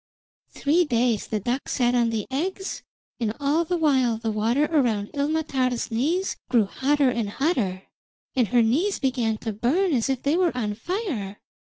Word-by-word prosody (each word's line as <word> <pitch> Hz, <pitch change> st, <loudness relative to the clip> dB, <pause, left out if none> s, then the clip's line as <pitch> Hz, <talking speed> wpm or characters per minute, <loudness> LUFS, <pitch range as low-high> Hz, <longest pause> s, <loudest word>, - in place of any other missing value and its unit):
Three 315 Hz, +5 st, +2 dB
days 240 Hz, -, +1 dB
the 215 Hz, -, -1 dB
duck 245 Hz, +6 st, -2 dB
sat 245 Hz, -2 st, +1 dB
on 240 Hz, -2 st, +3 dB
the 220 Hz, -3 st, -2 dB
eggs, 375 Hz, +8 st, -3 dB, 0.4 s
and 225 Hz, -2 st, -1 dB
all 290 Hz, +4 st, +2 dB
the 350 Hz, +2 st, -1 dB
while 260 Hz, -8 st, +2 dB
the 225 Hz, 0 st, -2 dB
water 230 Hz, +7 st, +1 dB
around 240 Hz, -11 st, 0 dB
Ilmatar's 280 Hz, -5 st, -1 dB
knees 320 Hz, +12 st, 0 dB
grew 235 Hz, -5 st, +4 dB
hotter 275 Hz, +5 st, +1 dB
and 230 Hz, -4 st, -2 dB
hotter, 205 Hz, -, -1 dB, 0.5 s
and 250 Hz, -4 st, +3 dB
her 240 Hz, +1 st, +3 dB
knees 320 Hz, -, +1 dB
began 245 Hz, -5 st, 0 dB
to 220 Hz, 0 st, -4 dB
burn 305 Hz, -, +1 dB
as 240 Hz, -1 st, +1 dB
if 265 Hz, -2 st, -1 dB
they 285 Hz, +3 st, +2 dB
were 350 Hz, -6 st, +1 dB
on 210 Hz, -4 st, -1 dB
fire. 255 Hz, -, -4 dB
255 Hz, 170 wpm, -24 LUFS, 225-300 Hz, 0.5 s, grew